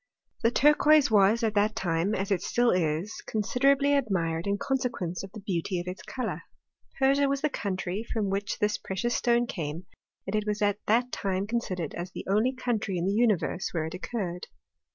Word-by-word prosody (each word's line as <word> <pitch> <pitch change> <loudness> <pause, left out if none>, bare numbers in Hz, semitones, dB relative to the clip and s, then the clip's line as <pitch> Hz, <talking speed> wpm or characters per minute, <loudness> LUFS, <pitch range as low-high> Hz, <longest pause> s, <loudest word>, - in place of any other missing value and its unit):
The 230 - +4
turquoise 295 +1 +5
was 210 +3 +4
at 220 -2 +1
that 210 +1 +2
time, 175 0 0
as 195 +1 -2
it 185 -3 +2
still 240 +4 +2
is, 170 +3 -1
con 215 -1 -1
siderably 275 +5 +3
admired 175 -10 0
in 200 0 +1
consequence 230 -10 -2
of 195 - -9
the 215 - -9
beauty 185 -1 -2
of 175 - -5
its 180 +1 -5
colour. 255 - -4 0.6
Persia 275 +1 +3
was 275 0 -1
the 305 - 0
country 190 -1 -3
from 210 -4 -1
which 200 0 -2
this 210 0 0
pre 190 - -6
cious 240 +5 0
stone 240 0 +2
came, 165 -4 -5 0.4
and 195 - -3
it 215 0 -1
was 210 0 -1
at 205 0 +1
that 245 +3 +2
time 190 0 -1
considered 195 -8 -3
as 175 +1 -5
the - - -7
only 215 +6 +2
country 225 -7 -1
in 170 - -1
the 195 - +1
universe 210 -5 +1
where 160 -3 -1
it 160 - -6
occurred. 185 -2 -4
205 Hz, 195 wpm, -28 LUFS, 185-240 Hz, 0.6 s, turquoise